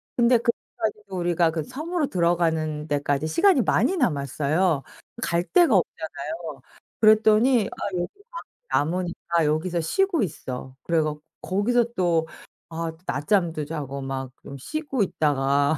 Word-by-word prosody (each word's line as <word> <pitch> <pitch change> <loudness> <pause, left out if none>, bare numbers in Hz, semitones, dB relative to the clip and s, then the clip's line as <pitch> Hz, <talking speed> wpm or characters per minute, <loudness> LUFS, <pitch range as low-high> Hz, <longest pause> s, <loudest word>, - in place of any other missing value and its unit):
근데 240 0 +5
그래 235 +1 +1 0.3
가지고 210 -3 -3
우리가 175 -1 +2
그 160 -2 -2
섬으로 310 - -2
들어가는 160 -3 0
데까지 145 +1 0
시간이 375 - +4
많이 380 - +2
남았어요. 150 - +1 0.4
갈 170 +1 +1
데가 340 - +4
없잖아요. 160 -3 -3 0.4
그랬더니 220 +1 +5
"아 - - -5
여기 175 0 -1 0.2
방 - - -6 0.5
남으니까 170 -2 -1
여기서 165 +3 0
쉬고 370 - +1
있어." 130 -5 -6
그래 165 -2 +2
갖 150 -1 -2 0.2
거기서 235 +5 +1
또 170 -3 +1 0.5
아 165 0 -2
낮잠도 155 - 0
자고 140 -3 -5
막 135 -1 -4
좀 140 - -9
쉬고 275 - -2
있다가 145 -3 +1
170 Hz, 290 characters per minute, -24 LUFS, 150-215 Hz, 0.5 s, 근데